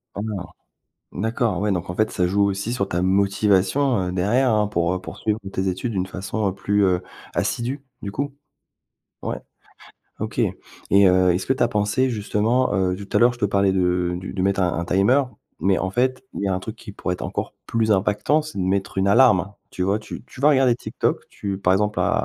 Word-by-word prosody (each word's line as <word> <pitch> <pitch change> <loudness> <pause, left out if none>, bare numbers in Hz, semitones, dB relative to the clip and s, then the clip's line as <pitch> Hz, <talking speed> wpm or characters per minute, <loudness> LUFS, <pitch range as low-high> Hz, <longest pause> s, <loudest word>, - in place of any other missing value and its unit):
Ah 100 - -3
non? 110 -2 -3 0.8
D'accord, 115 -1 -1
ouais, 105 +1 0
donc, 90 -1 -2
en - - -4
fait, 110 +3 +1
ça 90 - +1
joue 100 +3 +2
aussi 100 +3 -1
sur 120 -6 -1
ta 90 - -1
motivation, 100 +5 +2
heu, - - -3
derrière, 110 +8 +2
hein, 105 -1 +2
pour, 85 -4 0
heu, 95 - -3
poursuivre 105 +3 -3
tes 95 0 -1
études 95 +6 -2
d'une 95 -2 -1
façon, 100 +2 -2
heu, 95 - -3
plus, 100 +1 +1
heu, 90 -1 +2 0.3
assidue, 130 +4 -1 0.2
du 100 - -4
coup? 140 +6 -3 0.9
Ouais, - - -2 0.8
OK. - - -5 0.5
Et 100 0 +6
heu, 90 0 +4
est-ce 95 - -1
que - - +3
tu 130 - -1
as - - +5
pensé, 105 +4 +1
justement, 115 +2 +1
heu, 95 -1 +1
tout 100 +2 -4
à - - +6
l'heure 120 +1 +6
je 120 - -12
te - - +1
parlais 100 -1 +2
de 90 -1 +1
du 90 +2 -6
de 95 - -2
mettre 100 +1 +1
un 90 -2 +1
un 85 - -2
timer, 100 +11 +3 0.4
mais 95 +3 +3
en 95 - -2
fait 130 - 0
il - - -4
y - - 0
a 95 - +1
un 95 - -2
truc 110 +4 -7
qui 110 -2 -10
pourrait 90 -2 -3
être - - -9
encore - - -3
plus 115 -1 0
impactant, 105 +9 +2
c'est 155 -7 -8
de - - 0
mettre 95 +2 -1
une 95 +1 +2
alarme. 100 -4 +4 0.2
Tu 90 - -4
vois, 100 +3 +1
tu 110 - -9
tu 130 - -13
vas 145 +2 +5
regarder 130 -4 +4
TikTok, - - -2
tu 100 -2 -5
par 95 -1 +2
exemple, 105 +2 +1
à - - +2
100 Hz, 225 wpm, -22 LUFS, 95-115 Hz, 0.9 s, Et